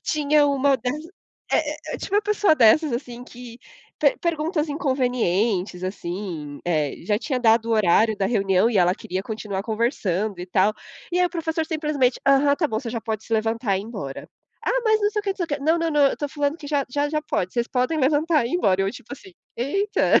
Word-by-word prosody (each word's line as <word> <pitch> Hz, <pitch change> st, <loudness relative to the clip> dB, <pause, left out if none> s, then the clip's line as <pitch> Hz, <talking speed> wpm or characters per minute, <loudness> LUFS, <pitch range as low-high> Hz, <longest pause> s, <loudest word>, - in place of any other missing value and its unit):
Tinha 300 Hz, -1 st, +2 dB
uma 280 Hz, -1 st, +2 dB
das 250 Hz, +2 st, -3 dB, 0.6 s
é -, -, +5 dB
é 300 Hz, -, -5 dB, 0.2 s
é, -, -, -4 dB
tinha -, -, -7 dB
uma 415 Hz, -, +3 dB
pessoa 415 Hz, -4 st, +3 dB
dessas, 285 Hz, +4 st, +4 dB
assim, 245 Hz, 0 st, -5 dB
que 245 Hz, -1 st, -11 dB, 0.4 s
per -, -, +3 dB
perguntas 325 Hz, -1 st, -1 dB
inconvenientes, 235 Hz, -, 0 dB
assim, 175 Hz, -5 st, -5 dB
eh, 155 Hz, -5 st, 0 dB
já 205 Hz, +3 st, +1 dB
tinha 260 Hz, 0 st, -2 dB
dado 225 Hz, -1 st, +4 dB
o -, -, +1 dB
horário 215 Hz, +1 st, +3 dB
da 195 Hz, -, 0 dB
reunião 195 Hz, -1 st, +2 dB
e 210 Hz, -, +1 dB
ela 180 Hz, +1 st, +4 dB
queria 185 Hz, -1 st, -4 dB
continuar 210 Hz, -3 st, -4 dB
conversando 215 Hz, -, -1 dB
e 180 Hz, -, -6 dB
tal, 190 Hz, +3 st, +2 dB, 0.4 s
e 355 Hz, -, 0 dB
aí 360 Hz, -, +4 dB
o -, -, -7 dB
professor 320 Hz, -1 st, -2 dB
simplesmente: 300 Hz, -6 st, 0 dB
"Aham, 275 Hz, +1 st, +4 dB
tá 310 Hz, +1 st, 0 dB
bom, 220 Hz, -, -1 dB
você 235 Hz, -2 st, -5 dB
já 230 Hz, 0 st, -3 dB
pode 220 Hz, -1 st, -4 dB
se -, -, -8 dB
levantar 225 Hz, -2 st, 0 dB
e -, -, -2 dB
ir -, -, -7 dB
embora". 200 Hz, -, -7 dB, 0.4 s
"Ah, -, -, +1 dB
mas 435 Hz, -1 st, +3 dB
não 415 Hz, 0 st, +2 dB
sei 420 Hz, 0 st, -1 dB
o 400 Hz, -2 st, -2 dB
que". 290 Hz, -, -2 dB
"Não, 315 Hz, +4 st, +2 dB
não, 330 Hz, 0 st, 0 dB
não, 295 Hz, -1 st, +3 dB
eu -, -, +2 dB
estou 290 Hz, -, -4 dB
falando 290 Hz, +1 st, -1 dB
que 295 Hz, -4 st, -10 dB
já 285 Hz, -2 st, +1 dB
já 290 Hz, +3 st, -1 dB
já 305 Hz, +1 st, -1 dB
pode, 185 Hz, -, -2 dB
vocês 235 Hz, -1 st, 0 dB
podem 255 Hz, +6 st, 0 dB
levantar 295 Hz, 0 st, +2 dB
e -, -, -5 dB
embora", 195 Hz, -, +2 dB
eu, 195 Hz, -, 0 dB
tipo 245 Hz, +1 st, -11 dB
assim: 380 Hz, +7 st, -11 dB, 0.2 s
"Eita". 395 Hz, -, +2 dB
250 Hz, 215 wpm, -23 LUFS, 210-305 Hz, 0.6 s, é